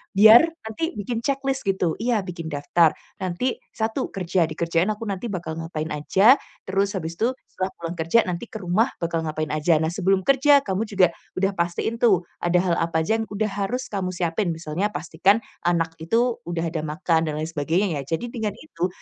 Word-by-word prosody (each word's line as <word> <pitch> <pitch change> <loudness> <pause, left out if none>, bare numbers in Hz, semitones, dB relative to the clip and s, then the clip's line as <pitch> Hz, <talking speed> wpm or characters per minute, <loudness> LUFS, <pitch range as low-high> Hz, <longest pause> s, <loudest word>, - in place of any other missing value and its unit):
biar 215 +4 +10 0.2
nanti 220 +9 -3
bikin 220 +3 -3
ceklis 270 +2 -1
gitu, 190 -3 +1
iya 230 -2 +1
bikin 170 -3 -6
daftar 155 +2 +2 0.2
nanti 190 +7 -2 0.2
1 220 0 -1
kerja, 180 -2 +1
di 155 - -7
kerjaan 170 +2 +1
aku 215 - -8
nanti 200 +1 -3
bakal 170 -6 -4
ngapain 160 -1 -4
aja, 195 - +4 0.2
terus 195 +1 0
habis 165 -2 -5
itu 245 +4 +1 0.2
setelah 185 - -2
pulang 170 +1 -5
kerja 165 +9 +3
nanti 180 +5 -4
ke 220 -2 -8
rumah 185 +7 +2
bakal 170 -1 -2
ngapain 155 0 -3
aja. 155 +2 +2
Nah, 160 +1 +1
sebelum 190 +1 +1
kerja 275 +2 +5
kamu 200 +1 -2
juga 185 -4 +3 0.2
udah 195 +1 +1
pastiin 175 +5 -2
tuh 195 -8 +4 0.2
ada 175 0 0
hal 175 -2 +1
apa 165 -1 0
aja 220 +7 +1
yang 220 - -3
udah 210 +1 -1
harus 245 +6 -2
kamu 185 -3 -2
siapin. 175 0 -1
Misalnya 165 +4 -2
pastikan 190 +5 +1 0.2
anak 165 -2 0
itu 230 +9 +1
udah 170 -1 -2
ada 165 - -2
makan 160 +1 0
dan 150 - -2
lain 155 +1 -3
sebagainya 165 +2 0
ya. 140 +4 -2
Jadi, 235 +7 -6
dengan 220 -4 -3
itu 180 - -3
185 Hz, 195 wpm, -24 LUFS, 165-220 Hz, 0.2 s, biar